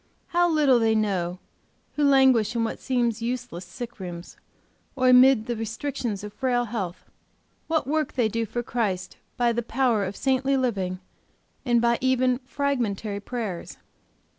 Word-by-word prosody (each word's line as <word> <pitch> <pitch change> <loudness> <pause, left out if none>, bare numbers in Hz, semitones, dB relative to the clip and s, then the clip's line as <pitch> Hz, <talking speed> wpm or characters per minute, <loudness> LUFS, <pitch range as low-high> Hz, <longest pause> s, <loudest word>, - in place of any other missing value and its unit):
How 350 0 +3
little 290 -6 +4
they 225 -1 +2
know 185 -5 0 0.6
who 300 - 0
languish 260 -5 +4
in 230 - +1
what 225 - -3
seems 240 -3 0
useless 240 -6 -4
sick 230 +6 -8
rooms, 175 -2 -8 0.6
or 255 -1 +3
amid 250 -2 +6
the 240 - -2
restrictions 225 -1 -4
of 210 0 -7
frail 245 0 0
health, 195 -6 -5 0.6
what 320 -3 0
work 305 +3 -1
they 245 -4 +2
do 225 +1 -2
for 240 +4 -3
Christ 195 -7 -2 0.2
by 240 -1 +3
the 240 - -1
power 235 -2 +1
of 195 +1 -4
saintly 270 +2 +1
living, 195 -8 -1 0.7
and 240 -2 +3
by 235 0 +2
even 255 -1 +2
fragmentary 235 -8 -2
prayers. 210 -5 -5
235 Hz, 150 wpm, -25 LUFS, 210-260 Hz, 0.7 s, amid